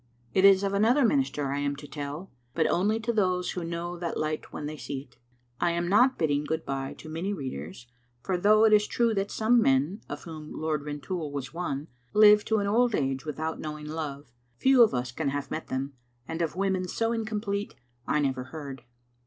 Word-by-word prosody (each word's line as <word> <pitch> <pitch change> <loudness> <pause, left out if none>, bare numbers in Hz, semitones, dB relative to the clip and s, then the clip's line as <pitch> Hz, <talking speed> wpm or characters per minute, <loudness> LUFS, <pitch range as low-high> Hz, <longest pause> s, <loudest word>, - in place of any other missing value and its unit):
It 190 - +4
is 195 0 +7
of 200 0 0
another 230 +7 +4
minister 225 - +1
I 140 - -1
am 145 0 -1
to 145 +1 -10
tell, 145 +6 -6 0.2
but 160 - +2
only 210 +5 +2
to 235 +2 -1
those 185 -4 +1
who 180 - -4
know 170 +1 -4
that 170 -1 -3
light 155 0 -3
when 150 - -5
they 155 +1 -4
see 140 -2 -5
it. 140 - -21 0.4
I 170 - +2
am 170 0 -1
not 245 +8 +4
bid 160 - +1
ding 145 0 +1
good 160 +2 -3
bye 135 -1 -3
to - - -11
many 165 +6 -3
readers, 120 - -6 0.4
for 190 - 0
though 215 +4 +5
it 215 - +5
is 210 0 +5
true 235 -1 +1
that 195 -1 -1
some 230 +2 +3
men, 145 +6 +2
of 145 +1 -6
whom 155 -2 -8
Lord 155 -2 -1
Rintoul 150 +2 -4
was 140 0 -5
one, 155 -4 -3 0.3
live 210 0 +8
to 220 - +2
an 200 - 0
old 230 +3 +3
age 135 0 -1
without 160 +1 -3
knowing 150 -1 -6
love, 150 -4 -5 0.3
few 265 - +5
of 225 - +6
us 125 0 -2
can 140 +3 -2
have 145 0 -4
met 160 - -4
them, 135 +2 -3 0.3
and 165 +1 -3
of 165 -1 -1
women 190 -1 0
so 225 +5 0
incomplete 215 -2 -2 0.3
I 150 - +2
never 130 -2 -1
heard. 140 -1 -8
165 Hz, 210 wpm, -28 LUFS, 145-205 Hz, 0.4 s, live